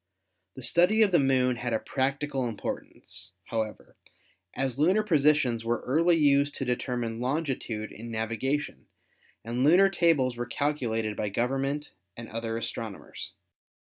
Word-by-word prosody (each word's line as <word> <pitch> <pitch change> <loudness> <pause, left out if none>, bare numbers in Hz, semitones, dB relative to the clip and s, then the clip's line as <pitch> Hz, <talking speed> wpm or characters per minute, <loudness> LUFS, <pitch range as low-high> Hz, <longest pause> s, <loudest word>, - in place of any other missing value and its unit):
The 130 - -7
study 180 - +4
of 205 - +2
the 175 - +5
Moon 130 -2 +2
had 120 0 -2
a 110 - +1
practical 135 -1 -1
importance, 95 -3 -3
however, 110 -2 -4 0.6
as 135 -1 -2
lunar 185 +8 +4
posi 150 -6 +4
tions 120 -6 -1
were 120 +1 -1
early 165 +6 +3
used 145 -1 +3
to 135 - -3
determine 120 -2 -2
longitude 125 -6 -2
in 115 +2 -9
navigation 115 +6 -2 0.6
and 120 +2 -1
lunar 185 +7 +6
tables 155 -9 +2
were 120 0 -3
calculated 115 -6 -1
by 105 - -2
government 135 +7 -1 0.3
and 115 0 -6
other 115 0 -3
astronomers. 115 -3 -6
130 Hz, 140 wpm, -28 LUFS, 115-145 Hz, 0.6 s, lunar